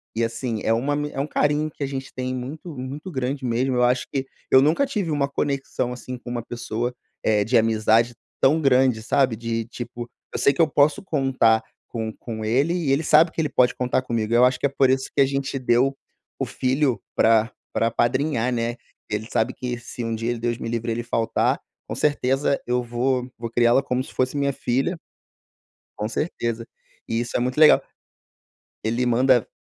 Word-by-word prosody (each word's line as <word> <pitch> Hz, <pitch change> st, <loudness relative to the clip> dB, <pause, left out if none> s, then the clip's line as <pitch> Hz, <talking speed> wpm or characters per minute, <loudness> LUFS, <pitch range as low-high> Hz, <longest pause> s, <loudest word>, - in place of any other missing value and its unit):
e 115 Hz, -, +1 dB
assim, 115 Hz, -1 st, -2 dB
é 110 Hz, -, +1 dB
uma 135 Hz, +6 st, 0 dB
ami 150 Hz, 0 st, -1 dB
é -, -, -5 dB
um 140 Hz, -, 0 dB
carinho 150 Hz, +1 st, +1 dB
que 140 Hz, -, -6 dB
a -, -, -1 dB
gente 135 Hz, -1 st, -6 dB
tem 130 Hz, 0 st, -3 dB
muito 145 Hz, +5 st, -7 dB
muito 145 Hz, +8 st, -6 dB
grande 130 Hz, 0 st, -3 dB
mesmo, 125 Hz, +2 st, 0 dB
eu 125 Hz, -, +3 dB
acho 125 Hz, +1 st, +2 dB
que 135 Hz, -1 st, -1 dB, 0.3 s
eu 130 Hz, -, +8 dB
nunca 160 Hz, -, +3 dB
tive 210 Hz, -11 st, -2 dB
uma 140 Hz, -2 st, +1 dB
conexão 135 Hz, -3 st, -2 dB
assim 125 Hz, 0 st, -7 dB
com 125 Hz, -, -9 dB
uma 120 Hz, -2 st, -3 dB
pessoa, 120 Hz, 0 st, -3 dB, 0.3 s
eh, 105 Hz, -2 st, +3 dB
de 120 Hz, +3 st, +2 dB
amizade, 115 Hz, +1 st, +3 dB, 0.3 s
tão 155 Hz, +4 st, +4 dB
grande, 130 Hz, -4 st, +3 dB
sabe. 130 Hz, -1 st, +2 dB
De 115 Hz, 0 st, -3 dB
tipo, 120 Hz, 0 st, -7 dB, 0.3 s
eu -, -, -2 dB
sei 140 Hz, -, +4 dB
que 165 Hz, -, +1 dB
eu 160 Hz, -, +5 dB
posso 145 Hz, +1 st, +3 dB
contar 135 Hz, -9 st, +2 dB, 0.2 s
com 110 Hz, -2 st, -4 dB
com 110 Hz, -2 st, -5 dB
ele 135 Hz, +10 st, +2 dB
e 160 Hz, -6 st, 0 dB
ele 140 Hz, +3 st, +2 dB
sabe 160 Hz, +3 st, +5 dB
que 160 Hz, -, -2 dB
ele 150 Hz, -, -1 dB
pode 125 Hz, -1 st, +3 dB
contar 125 Hz, 0 st, 0 dB
comigo, 115 Hz, -3 st, -2 dB
eu 120 Hz, +1 st, +6 dB
acho 125 Hz, -, +2 dB
que 140 Hz, -, +2 dB
é -, -, -7 dB
por 135 Hz, -1 st, +3 dB
isso 130 Hz, 0 st, +1 dB
que -, -, 0 dB
a -, -, +6 dB
gente 135 Hz, 0 st, -2 dB
deu 130 Hz, +2 st, +2 dB, 0.4 s
o 135 Hz, -, 0 dB
filho 130 Hz, -2 st, 0 dB
para 115 Hz, 0 st, +4 dB, 0.2 s
para 115 Hz, -, +2 dB
apadrinhar, 125 Hz, +1 st, +1 dB
né, 120 Hz, 0 st, -1 dB
que -, -, -29 dB
ele 110 Hz, +2 st, -4 dB
sabe 110 Hz, -, +1 dB
que 125 Hz, -1 st, -4 dB
se 120 Hz, 0 st, -7 dB
um 115 Hz, 0 st, -2 dB
dia 115 Hz, +2 st, -2 dB
ele, 120 Hz, -, -3 dB
Deus 120 Hz, 0 st, -1 dB
me -, -, -5 dB
livre, 115 Hz, 0 st, -2 dB
ele 120 Hz, +1 st, -2 dB
faltar, 115 Hz, -1 st, 0 dB, 0.3 s
com -, -, -4 dB
certeza 140 Hz, -1 st, +1 dB
eu 125 Hz, 0 st, +1 dB
vou 125 Hz, +1 st, -1 dB
vou 115 Hz, -1 st, -5 dB
criá-la 120 Hz, +3 st, +4 dB
como 130 Hz, -1 st, -1 dB
se -, -, -12 dB
fosse 130 Hz, +2 st, 0 dB
minha 140 Hz, 0 st, +1 dB
filha. 135 Hz, +10 st, -1 dB, 1.0 s
Com 105 Hz, -, -1 dB
certeza. 115 Hz, -4 st, -3 dB, 0.4 s
E 115 Hz, -, -1 dB
isso 120 Hz, 0 st, -4 dB
é -, -, 0 dB
muito 125 Hz, +3 st, -1 dB
legal. 155 Hz, -, +7 dB, 1.0 s
Ele 115 Hz, +3 st, 0 dB
manda 125 Hz, 0 st, +3 dB
125 Hz, 205 wpm, -23 LUFS, 115-140 Hz, 1.0 s, eu